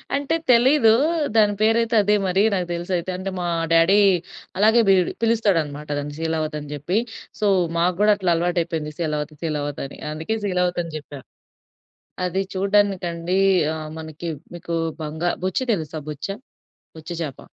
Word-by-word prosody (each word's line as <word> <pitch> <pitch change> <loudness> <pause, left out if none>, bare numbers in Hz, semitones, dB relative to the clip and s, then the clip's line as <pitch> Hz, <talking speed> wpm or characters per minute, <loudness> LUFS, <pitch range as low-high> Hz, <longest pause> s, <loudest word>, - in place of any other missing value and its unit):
అంటే 285 +3 0 0.2
తెలీదు. 240 -1 +5 0.4
దాని 210 -2 +5
పేరయితే 225 +1 +2
అదే 210 +1 +3
మరి. 190 +3 +2
నాకు 180 -2 -1
తెలిసయితే. 175 +1 -2
అంటే 190 +1 -4
మా 175 - -2 0.3
డ్యాడీ 170 +5 +5 0.6
అలాగే 220 +3 +5
బీడ్ 185 -2 +4
పిలుస్తాడనమాట. 165 -10 +1
దాన్ని 145 0 -5
శీలావతి 160 -1 -2
అని 145 -1 -9
జెప్పి. 170 +9 -1 0.4
సో, 215 - 0 0.3
మాకు 175 +1 +2
గూడా 210 0 +6
అట్లా 185 -3 +1
అలవాటయిపోయింది, 165 -3 -1
శీలావతి 150 -2 -2
శీలావతని. 145 -3 -3
అందుకే 160 +9 -3
శీలావతని 180 -3 -1
చెప్పాను. 145 -2 -11 1.0
అది 185 +2 -1
చూడ్డానికండి 190 -3 +1 0.4
ఆహ్, 155 -1 -6
మనకి 160 +1 -6 0.3
మీకు 170 0 -5 0.3
బంగా 160 +3 -2 0.2
బొచ్చ 185 - 0 0.2
తెలుసా 155 -2 -5
బొచ్చ? 150 +3 -6 0.7
బొచ్చ 160 +2 -10
చేప. 140 -5 -5
175 Hz, 135 wpm, -22 LUFS, 155-200 Hz, 1.0 s, గూడా